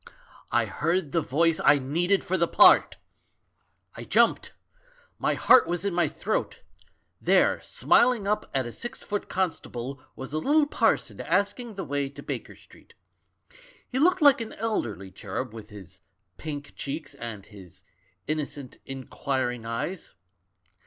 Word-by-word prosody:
I - - +2
heard 170 -1 -1
the 165 - +1
voice 160 +4 +1
I 145 +1 +6
needed 170 +9 +1
for 185 - -1
the 170 -2 +2
part - - +6 1.0
I - - -8
"I - - -6
jumped. - - +2 0.7
My - - +1
heart 250 - +6
was 175 +3 -2
in 200 - 0
my 175 0 +2
throat. - - -3 0.6
There, - - +3
smiling 235 -5 +3
up 210 +1 -1
at 135 -2 0
a 120 - -6
six 240 - -7
foot 205 -1 -4
constable, 140 -8 -3
was 135 +2 -8
a 155 - 0
little 295 - +3
parson 225 - 0
asking 205 +6 -1
the 190 - -4
way 140 -1 -2
to 140 - -11
Baker - - -6
Street. - - -20 0.9
He 260 - -3
looked 345 +2 +3
like 285 -3 +6
an 225 - -6
elderly 110 - -3
cherub, 100 - -5
with 110 -2 -10
his 100 -5 -13 0.3
pink 145 -2 -7
cheeks, 145 +1 -6
and 115 -6 -8
his 95 -5 -15 0.4
innocent, 145 -3 -5
inquiring 130 -2 -3
eyes. 145 +11 -4
155 Hz, 145 wpm, -26 LUFS, 130-200 Hz, 1.0 s, I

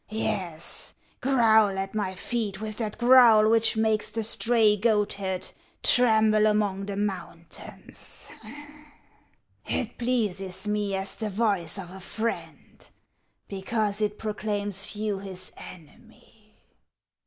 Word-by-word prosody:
Yes, 185 -6 -1 0.3
growl 220 -6 +3
at 195 0 -4
my 200 -3 -2
feet 210 -2 -3
with 215 -1 -6
that 215 -3 -4
growl 240 -3 +6
which 225 0 +4
makes 220 -1 +1
the 225 - -3
stray 225 -1 +3
goatherd 205 -3 -1 0.4
tremble 220 -3 +5
among 205 -2 0
the 200 - -4
mountains; 190 -4 -5 1.3
it 235 -1 -4
pleases 210 -6 -1
me 210 -1 -1
as 190 +1 -2
the 215 -2 -3
voice 200 -5 0
of 180 -3 -8
a 190 - -10
friend, 220 +5 -6 0.6
because 205 +1 -2
it 210 0 -1
proclaims 205 -2 -3
you 210 -2 -2
his 185 -2 -6
enemy. 215 +4 -15
210 Hz, 110 wpm, -26 LUFS, 195-220 Hz, 1.3 s, growl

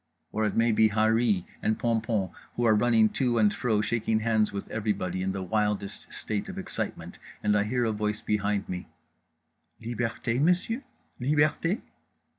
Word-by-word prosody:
Or 110 0 0
it - - -3
may 115 +1 +3
be 110 0 +4
Harree 110 -2 +2 0.2
and 110 - +1
Pompom 110 -5 0 0.2
who 120 - 0
are 110 - +6
running 110 0 +4
to 125 -1 0
and 105 -2 +4
fro 110 -6 +1
shaking 110 0 0
hands 110 -1 +2
with 100 - -5
everybody 100 -4 -1
in 95 +1 0
the 95 0 -3
wildest 105 0 -2
state 105 -2 -3
of - - -7
excitement, - - -5 0.2
and 105 0 +3
I 105 0 +2
hear 120 +2 0
a 110 - +1
voice 105 0 -1
behind 105 -2 0
me: 90 -1 -5 0.9
"_Liberté, 120 +1 -2
monsieur? 180 - +2 0.4
Liberté? 150 - +2
110 Hz, 160 wpm, -28 LUFS, 105-120 Hz, 0.9 s, are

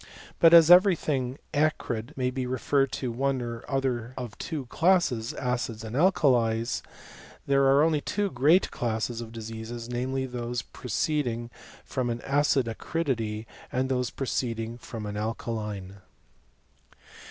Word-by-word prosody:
But 165 - +7
as 170 0 +8
every 185 +1 +8
thing 130 -4 -2 0.2
acrid 145 -4 -1
may 125 -1 0
be 130 -1 -3
referred 135 +2 +1
to 125 -3 -2
one 135 +2 0
or 115 -1 -5
other 130 -3 -1
of 120 -4 -6
two 155 -6 -4
classes, 150 -6 +2
acids 120 -3 -2
and 110 +1 -6
alkalies, 125 -10 +2 0.6
there 140 0 +3
are 135 +2 +5
only 155 -2 +2
two 205 +3 -1
great 150 +9 +3
classes 115 0 -2
of 115 -1 -8
diseases; 115 +1 -7
namely, 130 +2 -2
those 120 -1 -4
proceeding 125 -3 -2 0.3
from 130 -2 -2
an 120 0 -3
acid 140 -2 +2
acridity, 115 -4 -2 0.3
and 130 +1 0
those 125 -2 0
proceed 125 -3 -2
ing 115 +2 -5
from 115 -3 -7
an 105 0 -4
alkaline. 105 -3 -4
125 Hz, 140 wpm, -27 LUFS, 115-140 Hz, 0.6 s, as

